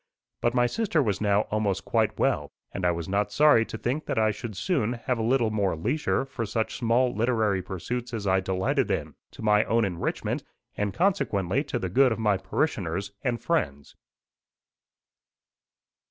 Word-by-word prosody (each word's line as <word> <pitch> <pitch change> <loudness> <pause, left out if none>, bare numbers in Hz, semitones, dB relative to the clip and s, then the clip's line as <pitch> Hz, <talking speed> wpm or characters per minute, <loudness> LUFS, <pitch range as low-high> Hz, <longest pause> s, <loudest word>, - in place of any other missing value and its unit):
But 120 +1 +1
my 120 -1 +4
sister 195 - 0
was 105 -4 -1
now 100 -1 +3
almost 105 -3 0
quite - - +1
well, - - +1 0.2
and 95 - -3
I - - +4
was 85 -1 -4
not 100 +2 0
sorry 150 -6 +5
to - - -6
think 130 +8 -2
that - - -2
I 110 -1 +3
should 105 0 -7
soon 125 - 0
have 125 0 -2
a - - 0
little 115 -1 +2
more 100 -5 0
leisure 125 - 0
for 130 -3 -5
such 110 +1 -2
small 120 +1 +2
literary 110 -4 +1
pursuits 95 +7 -5
as 110 -4 -4
I 95 -1 +3
delighted 95 0 0
in - - -2 0.2
to - - -11
my 105 0 +4
own 115 -1 +2
enrichment, 90 -3 -2 0.3
and 105 -1 -1
consequently 130 - +1
to 135 - -2
the 95 - -2
good 130 +7 +4
of 110 - -1
my 105 -3 +2
parishioners 95 - -2
and 120 -3 0
friends. 70 - -2
110 Hz, 175 wpm, -26 LUFS, 100-125 Hz, 0.3 s, sorry